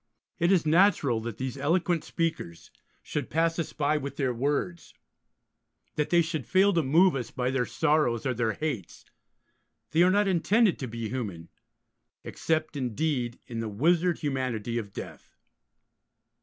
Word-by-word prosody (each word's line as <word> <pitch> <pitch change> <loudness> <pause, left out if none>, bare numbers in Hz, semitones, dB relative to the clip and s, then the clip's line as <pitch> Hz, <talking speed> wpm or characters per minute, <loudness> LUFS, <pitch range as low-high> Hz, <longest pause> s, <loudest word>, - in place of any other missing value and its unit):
It 170 +2 +3
is 180 -5 +3
natural 155 - +3
that 115 -1 -6
these 130 +1 -4
eloquent 170 +3 +1
speakers 160 - -4 0.3
should - - -4
pass 165 +1 +1
us 165 - -3
by 150 +1 0
with 140 -1 -5
their 130 -3 0
words, 145 +7 -2 1.0
that 150 - -1
they 170 -1 +4
should 155 -4 -4
fail 195 +1 +4
to 170 - +3
move 165 +5 +4
us 120 -4 -3
by 125 0 -2
their 130 -2 0
sorrows 150 -7 +1
or 130 - +1
their 115 -2 0
hates: 135 - -5 0.9
they 160 +3 +3
are 180 - +6
not 205 +2 +3
intended 195 +3 +2
to 130 - -4
be 115 -1 -5
human, 100 -10 -5 0.7
except, 155 -1 -2
indeed, 125 -1 -2
in 115 -1 -6
the 115 -1 -3
wizard 170 - +2
humanity 125 -5 -2
of 100 -3 -7
Death. - - -10
145 Hz, 155 wpm, -27 LUFS, 120-165 Hz, 1.0 s, are